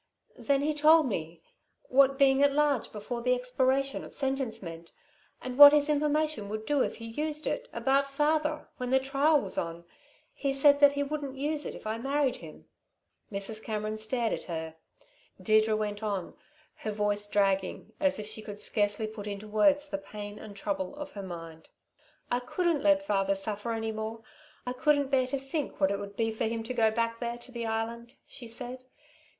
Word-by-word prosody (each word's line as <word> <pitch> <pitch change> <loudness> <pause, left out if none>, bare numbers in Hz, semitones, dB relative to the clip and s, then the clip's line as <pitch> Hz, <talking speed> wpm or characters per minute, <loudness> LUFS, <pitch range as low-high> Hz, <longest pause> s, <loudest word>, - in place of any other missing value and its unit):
Then 280 -1 +1
he 305 +1 +1
told 310 +1 +6
me 165 -7 -4 0.4
what 275 +1 +4
being 270 -1 +4
at 285 -1 +4
large 290 -4 +1
before 235 +3 -5
the 250 +1 +2
expiration 260 +2 0
of - - -8
sentence 265 -4 -1
meant, 165 -1 -9 0.5
and 255 +1 -5
what 290 0 +12
his 300 0 +4
information 300 -6 0
would 215 +1 -4
do 290 +1 +2
if - - 0
he 230 - -9
used 300 +6 -3
it, - - -2
about 275 +1 +1
father, 305 +2 0
when 250 -1 -3
the 265 +1 +4
trial 280 +3 +3
was 195 -7 -3
on. 170 0 -5 0.5
He 275 -1 -1
said 285 +1 +5
that 285 -1 +7
he 285 0 0
wouldn't 285 -2 -4
use 295 +2 -1
it - - -6
if - - -12
I'd 220 +1 -3
marry 275 +1 +1
him." - - -12 0.7
Mrs. 215 +2 -2
Cameron 215 -1 -3
stared 225 +2 -1
at - - -5
her. 160 -2 -5 0.6
Deirdre 215 0 +3
went 210 -1 -3
on, 200 -5 -3 0.4
her 215 - -4
voice 205 0 -1
dragging 195 -2 0
as 285 -2 +2
if 210 - -4
she 215 +1 -5
could 205 -1 -8
scarcely 205 0 0
put 215 -1 -7
into 205 +1 -6
words 285 +8 +3
the 195 - -4
pain 205 +1 -8
and 205 -2 -10
trouble 195 +1 -3
of 290 -1 -7
her 200 - -7
mind. 165 -3 -9 0.6
"I 245 - +2
couldn't 330 +4 0
let 295 -1 +3
father 195 -4 +1
suffer 205 +3 -3
any 225 -1 -2
more. 220 +1 -5 0.4
I 250 - -2
couldn't 285 0 +2
bear 260 -2 +3
to 275 - -2
think 270 +2 -4
what 195 -1 +3
it 200 - -1
would 200 0 -8
be 225 0 0
for 220 +1 -2
him 225 0 -2
to 230 - -4
go 225 -3 +3
back 230 +1 -1
there, 235 -1 -3
to 240 +1 -11
the 235 -2 -4
Island," 230 +2 -4
she 245 -4 -8
said. 250 +2 -6
235 Hz, 195 wpm, -29 LUFS, 210-280 Hz, 0.7 s, what